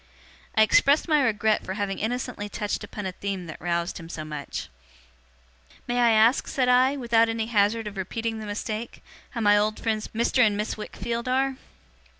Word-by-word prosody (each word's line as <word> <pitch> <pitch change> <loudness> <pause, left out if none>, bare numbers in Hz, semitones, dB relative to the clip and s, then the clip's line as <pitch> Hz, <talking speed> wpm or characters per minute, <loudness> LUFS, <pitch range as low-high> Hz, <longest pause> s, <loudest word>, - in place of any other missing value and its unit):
I 220 - +6
expressed 280 - +4
my 305 -3 +4
regret 220 -3 +1
for 190 - -5
having 200 -2 -2
innocently 225 -2 -3
touched 210 0 -3
upon 205 0 -6
a 190 - -2
theme 195 -1 -4
that 155 - -9
roused 170 +1 -1
him 165 0 -10
so 155 -2 -6
much. 150 -2 -6 1.2
'May 245 0 0
I 240 -1 +5
ask,' 225 +3 +4
said 255 -2 0
I, 255 +3 +4
'without 230 -3 +3
any 225 -1 -1
hazard 220 0 +1
of 210 -1 -7
repeating 225 +4 -3
the 215 - -7
mistake, 215 +2 -5 0.3
how 235 - -5
my 205 -1 +5
old 215 +1 +1
friends 215 -1 -1
Mr. 235 +3 0
and 210 -2 +2
Miss 210 +1 -2
Wickfield 230 +3 -5
are? 265 +1 +1
220 Hz, 180 wpm, -25 LUFS, 205-235 Hz, 1.2 s, I